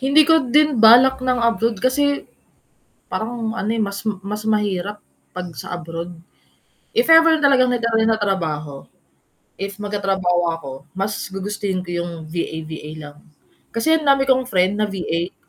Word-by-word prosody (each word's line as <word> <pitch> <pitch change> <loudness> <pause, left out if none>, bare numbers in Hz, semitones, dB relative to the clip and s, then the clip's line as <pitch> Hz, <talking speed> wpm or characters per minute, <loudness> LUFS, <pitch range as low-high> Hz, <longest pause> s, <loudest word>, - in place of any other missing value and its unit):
Hindi 280 +3 +4
ko 320 -4 +5
din 295 +1 +3
balak 250 +4 +6
ng 250 -2 +1
abroad 230 -2 0
kasi, 285 +2 0 0.8
parang 225 0 -3
ano 210 - -2
eh, 225 - 0
mas 200 +1 -4 0.2
mas 210 +2 -5
mahirap 205 -1 -1 0.3
'pag 180 -1 -5
sa 150 - -6
abroad. 170 0 -7 0.8
If 465 +2 +1
ever 325 0 +6
talagang 270 -3 +4
magaan 225 -2 +1
trabaho, 155 -8 -2 0.8
if 200 +1 -4
magtatrabaho 195 -3 0
ako, 145 -5 -8 0.2
mas 195 +2 -2 0.2
gugustuhin 195 -1 -3
ko 180 - -9
yung 170 0 -3 0.2
VA-VA 160 -2 -5
lang. 150 -2 -10 0.6
Kasi 320 +8 +2
ang 310 - -7
dami 275 -1 +4
kong 260 -1 +2
friend 190 -2 +1
na 215 - +1
VA 175 -3 -3
210 Hz, 145 wpm, -20 LUFS, 180-255 Hz, 0.8 s, balak